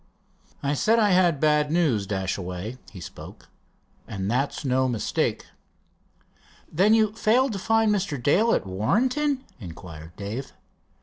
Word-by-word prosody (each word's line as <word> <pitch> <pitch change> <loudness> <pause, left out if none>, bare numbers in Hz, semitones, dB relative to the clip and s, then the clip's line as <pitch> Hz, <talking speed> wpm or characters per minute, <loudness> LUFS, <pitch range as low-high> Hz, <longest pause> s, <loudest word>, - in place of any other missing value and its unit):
"I 140 +1 +1
said 220 - +2
I 210 -3 +3
had 175 -5 +3
bad 150 0 +2
news, 140 - +1
Dashaway," 95 +3 -4
he 95 - -10
spoke, - - -11 0.6
"and 100 -1 -3
that's 135 +4 -1
no 130 0 +2
mistake." 115 -3 -1 1.3
"Then 200 +7 +4
you 215 -2 +2
failed 230 +3 +2
to 195 - -4
find 225 +2 +2
Mr. 195 -7 -1
Dale 195 - +3
at - - -2
Warrenton?" 255 - 0 0.2
inquired 85 -4 -10
Dave. 110 +7 -6
145 Hz, 130 wpm, -25 LUFS, -, 1.3 s, Then